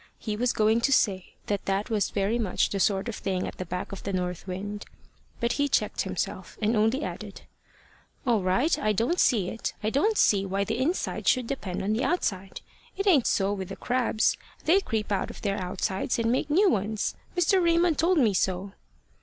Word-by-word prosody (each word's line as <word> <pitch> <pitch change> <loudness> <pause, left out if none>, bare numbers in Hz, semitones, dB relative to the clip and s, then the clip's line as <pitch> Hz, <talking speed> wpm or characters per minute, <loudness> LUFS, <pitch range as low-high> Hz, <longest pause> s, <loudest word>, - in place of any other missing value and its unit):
He 215 -2 -4
was 240 +3 +1
going 220 +2 +2
to 275 - +2
say 195 -8 +1
that 205 -1 -2
that 195 +3 -1
was 210 -2 +1
very 205 +4 0
much 205 -6 0
the 200 - -1
sort 195 +2 +1
of 235 - -3
thing 185 -2 -2
at - - -9
the 185 - -4
back 180 +2 -4
of 195 - -7
the 200 - -4
north 180 -1 -3
wind; 205 +3 -5 0.6
but 235 0 0
he 285 - +3
checked 280 - 0
himself - - -4
and 220 +2 +1
only 225 +7 +2
added, - - -6 0.8
"All 235 -5 +2
right. 190 - +2
I 215 0 +1
don't 235 - 0
see 205 -8 +3
it. 225 - -4
I 215 - 0
don't 420 - +2
see 200 -2 +4
why 195 +1 -1
the 225 +4 -2
inside 320 +8 -1
should 255 -2 +3
depend 205 -9 -4
on 205 +2 0
the 225 - 0
outside. 195 - -1 0.4
It 390 - -1
ain't 315 - +4
so 195 0 +1
with 190 -2 -5
the 195 - -5
crabs. 245 -3 +1 0.3
They 350 +5 +5
creep 220 - -3
out 200 - 0
of - - -10
their 200 -2 -1
outsides 190 +3 -2
and 230 0 +1
make 255 - 0
new 380 +8 +4
ones. 210 +1 -1 0.2
Mr. 355 +2 +3
Raymond 335 -1 +3
told 355 +2 +3
me 230 -8 +4
so." 190 +1 -1
215 Hz, 205 wpm, -27 LUFS, 195-255 Hz, 0.8 s, They